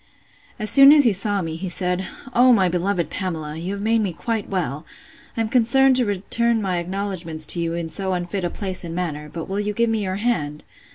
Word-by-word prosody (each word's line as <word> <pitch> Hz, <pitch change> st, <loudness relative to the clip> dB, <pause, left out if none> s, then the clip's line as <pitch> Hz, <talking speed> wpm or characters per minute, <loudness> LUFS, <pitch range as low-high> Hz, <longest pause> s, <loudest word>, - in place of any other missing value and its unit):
As 215 Hz, -3 st, -1 dB
soon 275 Hz, 0 st, +9 dB
as 295 Hz, -1 st, +7 dB
he 235 Hz, -5 st, +4 dB
saw 200 Hz, 0 st, -1 dB
me, 160 Hz, -1 st, -5 dB
he 185 Hz, +2 st, -5 dB
said, 180 Hz, +1 st, -1 dB, 0.3 s
O 250 Hz, +1 st, +5 dB
my 195 Hz, -6 st, +4 dB
beloved 175 Hz, -1 st, -1 dB
Pamela! 160 Hz, -5 st, -4 dB
you 175 Hz, +4 st, -4 dB
have 200 Hz, 0 st, -5 dB
made 225 Hz, +1 st, +2 dB
me 195 Hz, -4 st, -2 dB
quite 225 Hz, +4 st, -3 dB
well. 160 Hz, -6 st, -3 dB, 0.5 s
I'm 225 Hz, -1 st, 0 dB
concerned 255 Hz, +3 st, +3 dB
to 245 Hz, -3 st, +1 dB
return 225 Hz, +4 st, +1 dB
my 185 Hz, -4 st, -1 dB
acknowledgments 175 Hz, -3 st, -4 dB
to 175 Hz, -, +4 dB
you 165 Hz, 0 st, -2 dB
in 170 Hz, -1 st, -3 dB
so 190 Hz, +3 st, -3 dB
unfit 180 Hz, +1 st, -3 dB
a 175 Hz, -, 0 dB
place 190 Hz, 0 st, -3 dB
and 165 Hz, -1 st, -6 dB
manner; 150 Hz, -4 st, -4 dB
but 165 Hz, -1 st, -6 dB
will 195 Hz, +1 st, -3 dB
you 210 Hz, 0 st, -2 dB
give 230 Hz, +2 st, +1 dB
me 220 Hz, -1 st, 0 dB
your 190 Hz, -2 st, -2 dB
hand? 190 Hz, -10 st, -2 dB
190 Hz, 220 wpm, -22 LUFS, 170-220 Hz, 0.5 s, soon